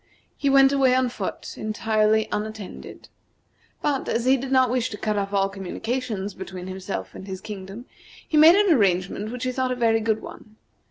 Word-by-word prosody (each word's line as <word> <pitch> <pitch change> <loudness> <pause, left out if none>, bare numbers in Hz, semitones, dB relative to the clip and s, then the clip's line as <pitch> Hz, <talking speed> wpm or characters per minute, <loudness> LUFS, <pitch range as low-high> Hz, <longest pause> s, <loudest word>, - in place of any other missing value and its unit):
He 280 - 0
went 270 0 +6
away 265 -2 +3
on 255 -1 +2
foot, - - -6
entirely 215 0 +1
unattended. 215 -1 -6 0.8
But, 280 -3 0
as 230 +1 0
he 260 +1 +5
did 265 0 -5
not 260 -2 +4
wish 250 -2 0
to 210 - -7
cut 215 0 -1
off 200 -1 -2
all 195 -1 +2
communication 205 +2 -4
between 185 -1 -7
himself 190 +1 -5
and 190 - -10
his 190 -1 -5
kingdom, 205 +2 -8 0.4
he - - -2
made 315 +3 +8
an 400 -3 +4
arrangement 200 - +1
which 250 0 -5
he 255 - 0
thought 255 0 -1
a - - 0
very 230 -2 +2
good 220 -1 0
one. 215 - -11
220 Hz, 185 wpm, -24 LUFS, 200-255 Hz, 0.8 s, made